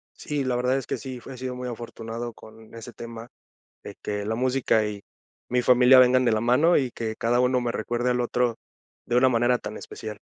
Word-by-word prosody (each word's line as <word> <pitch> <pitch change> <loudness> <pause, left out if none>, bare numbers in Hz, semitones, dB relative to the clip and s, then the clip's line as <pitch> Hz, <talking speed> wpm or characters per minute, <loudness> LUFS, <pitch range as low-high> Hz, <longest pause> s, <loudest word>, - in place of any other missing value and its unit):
Sí, 145 -2 -3
la 130 -1 -1
verdad 125 +2 +1
es 135 - -4
que - - -2
sí, 130 -2 -7
he 135 - -9
sido 130 0 -5
muy 125 0 -5
afortunado 115 0 -6
con 110 0 -16
ese 115 +1 -9
tema, 115 0 -9 0.5
de - - -9
que 105 -1 -3
la 110 - -1
música 125 -3 +1
y 105 -1 -6 0.5
mi 125 0 +1
familia 125 +1 +6
vengan 130 0 +5
de 120 - +3
la 110 - +1
mano, 135 +9 +4
y 130 -3 +1
que 110 -2 -5
cada 120 +1 +1
uno 125 0 +2
me 120 -1 -1
recuerde 120 +3 -1
al 125 0 +1
otro 120 -1 0 0.5
de 120 - 0
una 130 +1 +5
manera 120 +1 +2
tan 105 -2 -7
especial. 105 -2 -8
120 Hz, 215 wpm, -25 LUFS, 115-125 Hz, 0.5 s, familia